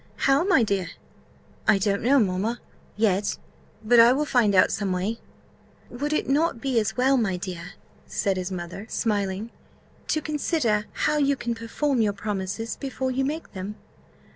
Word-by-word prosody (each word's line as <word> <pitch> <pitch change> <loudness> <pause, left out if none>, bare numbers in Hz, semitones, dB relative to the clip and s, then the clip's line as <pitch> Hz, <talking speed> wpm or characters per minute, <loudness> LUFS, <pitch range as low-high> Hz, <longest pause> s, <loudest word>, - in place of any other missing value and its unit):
"How, 275 +3 +3
my 360 - +4
dear?" 195 -5 -1 0.8
"I - - +6
don't 200 0 0
know, 265 +5 +4
mamma, 215 +1 0 0.4
yet 205 -2 +1 0.5
but 235 +2 +5
I 235 +2 +8
will 295 +3 0
find 235 -8 +2
out 185 - +5
some 200 -2 -1
way." 190 +5 -2 0.7
"Would 285 +5 -3
it 305 - 0
not 290 -1 +1
be 255 -2 +1
as 215 +1 -2
well, 265 +2 +4
my 195 -7 0
dear," 175 -2 -6 0.3
said 195 -1 0
his 185 0 -3
mother, 180 +3 -6
smiling, 205 0 -1 0.6
"to 310 - +1
consider 290 -8 0 0.2
how 300 0 +2
you 280 -1 +2
can 235 -2 -3
perform 235 +3 -1
your 210 -2 +2
promises 205 +2 -4
before 265 -1 -3
you 265 +1 0
make 305 +4 -4
them?" 195 +2 -6
225 Hz, 165 wpm, -25 LUFS, 200-270 Hz, 0.8 s, I